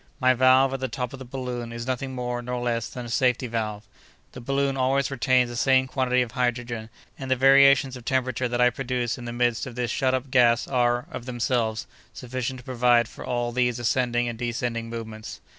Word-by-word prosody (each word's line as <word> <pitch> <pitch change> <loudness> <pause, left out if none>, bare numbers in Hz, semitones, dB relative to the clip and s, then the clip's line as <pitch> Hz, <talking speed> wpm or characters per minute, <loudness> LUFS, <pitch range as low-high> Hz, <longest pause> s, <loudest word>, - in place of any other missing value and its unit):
My 130 -1 +4
valve, 130 +1 +4
at 135 - -3
the 130 - -2
top 125 +1 -4
of 135 - -8
the 130 - -8
balloon, 125 -2 -5
is 115 0 -6
nothing 130 +1 -3
more 125 -1 -3
nor 125 +1 -4
less 120 -2 -2
than 125 -1 -7
a - - -8
safety 125 +1 +1
valve. 110 -3 -4 0.4
The 125 - -10
balloon 140 +2 0
always 135 +1 +1
retains 130 -1 +2
the - - -6
same 130 +2 +3
quantity 130 -1 +1
of 120 - -8
hydrogen, 120 -2 -2 0.3
and 135 - -6
the 130 - +3
variations 135 0 +5
of 125 - -10
temperature 130 0 0
that 120 0 -2
I 125 0 +5
produce 125 -2 -2
in 120 - -8
the 120 - -4
midst 120 0 0
of 125 - -9
this 120 -2 -2
shut 130 0 +1
up 130 +1 -5
gas 120 -2 +4
are, 120 -2 +1
of 120 - -7
themselves, 120 -2 -1 0.3
sufficient 130 +1 -4
to - - -22
provide 120 -2 +3
for - - -11
all 120 -1 -2
these 125 -1 +1
ascending 120 0 0
and 115 -1 -5
descending 120 -1 -3
movements. 110 -1 -7
125 Hz, 210 wpm, -25 LUFS, 120-130 Hz, 0.4 s, variations